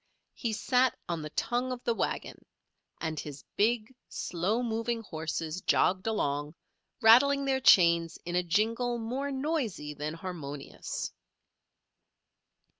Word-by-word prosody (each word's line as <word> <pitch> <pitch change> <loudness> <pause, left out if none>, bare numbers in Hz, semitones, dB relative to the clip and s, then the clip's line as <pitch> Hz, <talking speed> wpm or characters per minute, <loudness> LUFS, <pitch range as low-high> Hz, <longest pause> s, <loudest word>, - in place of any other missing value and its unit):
He 235 - -3
sat 250 +4 +2
on 170 -2 -2
the 150 - -5
tongue 245 +10 -1
of 250 -1 -5
the 235 - +1
wagon, - - -3 0.6
and 160 -2 -3
his 145 -2 -7
big, 225 +2 +1 0.2
slow 195 +8 -1
moving 230 0 -1
horses 160 -1 -4
jogged 185 +3 +2
along, 145 -8 -1 0.5
rattling 275 +5 +6
their 265 -1 +1
chains 170 -6 +5
in 175 0 -3
a 180 - +4
jingle 225 +7 +1
more 250 +5 -3
noisy 265 - -2
than 150 +2 -4
harmonious. 155 -6 -6
210 Hz, 120 wpm, -30 LUFS, 165-245 Hz, 0.6 s, rattling